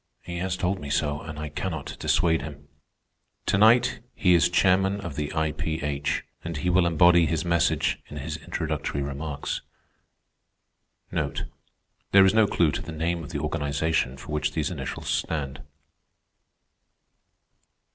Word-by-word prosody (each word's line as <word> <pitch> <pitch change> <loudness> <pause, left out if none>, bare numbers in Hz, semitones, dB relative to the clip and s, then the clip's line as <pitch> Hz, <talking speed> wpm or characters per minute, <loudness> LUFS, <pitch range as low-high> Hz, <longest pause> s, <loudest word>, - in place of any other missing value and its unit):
He 85 0 -6
has 95 0 -2
told 90 +2 0
me 70 - -7
so, 75 0 0
and 80 -2 -8
I 75 0 -4
cannot 80 0 -4
dissuade 80 -2 +2
him. 70 -2 -9 0.8
To - - +2
night 110 +4 +5 0.2
he 90 -2 +4
is 85 0 +5
chairman 95 +2 +3
of 85 -7 -6
the 75 0 -3
I.P.H., 75 -2 -1 0.2
and 85 -2 -4
he 90 +5 0
will 90 -1 +4
embody 85 0 +5
his 80 +2 -1
message 85 -1 +2
in - - -9
his - - -4
introductory 70 - -3
remarks. 70 +1 -4 1.5
There 95 -1 0
is 95 - +4
no 110 -1 +5
clew 85 -6 +2
to - - -3
the 85 - -7
name 85 +1 -2
of 70 - -8
the - - -3
organization 70 -2 0
for 65 +3 -10
which 75 0 -1
these 75 -2 -1
initials - - -5
stand. 70 -4 -2
80 Hz, 145 wpm, -26 LUFS, 75-90 Hz, 1.5 s, night